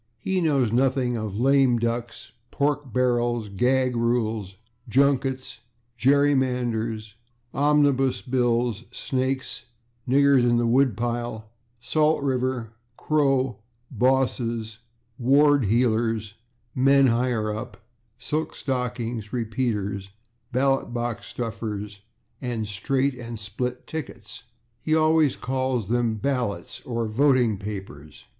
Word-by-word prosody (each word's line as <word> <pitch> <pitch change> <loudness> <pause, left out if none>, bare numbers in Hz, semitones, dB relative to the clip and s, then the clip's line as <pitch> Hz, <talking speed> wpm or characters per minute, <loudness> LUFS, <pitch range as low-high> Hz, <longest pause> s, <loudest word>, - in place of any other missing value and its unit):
He 190 -1 -1
knows 140 -8 +2
nothing 130 0 +1
of 110 -3 -4
/lame 130 0 +3
ducks/, 115 0 -3 0.2
/pork 145 -2 -1
barrels/, 120 -2 +1
/gag 125 +5 +1
rule/, 115 -3 0 0.4
/junkets/, 135 0 +1 0.4
/gerrymanders/, 125 -5 +1 0.4
/omnibus 140 -2 +2
bills/, 120 -3 +1
/snakes/, 130 0 -3 0.4
/niggers 140 0 +5
in 120 0 +3
the 120 - +1
woodpile/, 120 -2 0 0.3
/Salt 155 0 +2
river/, 130 -4 -1 0.2
/crow/, 135 -4 +1 0.4
/bosses/, 120 -3 0 0.4
/ward 140 0 +4
heelers/, 115 -2 +1 0.4
/men 135 +1 +5
higher 115 -3 0
up/, 120 +4 -7 0.4
/silk 155 +5 -3
stockings/, 120 -4 -3
/repeaters/, 105 -5 -2 0.4
/ballot 135 +1 +1
box 120 -2 -3
stuffers/ 105 -3 -5 0.4
and 120 -4 -3
/straight/ 130 +7 0
and 115 0 -6
/split 115 +5 -4
tickets/ 125 -8 -8 0.4
(he 155 - +1
always 155 -2 +3
calls 130 -4 -2
them 120 -2 +1
/ballots/ 120 -9 -2
or 115 -2 -1
/voting 120 -3 +2
papers 95 -8 -8
125 Hz, 100 wpm, -25 LUFS, 115-135 Hz, 0.4 s, niggers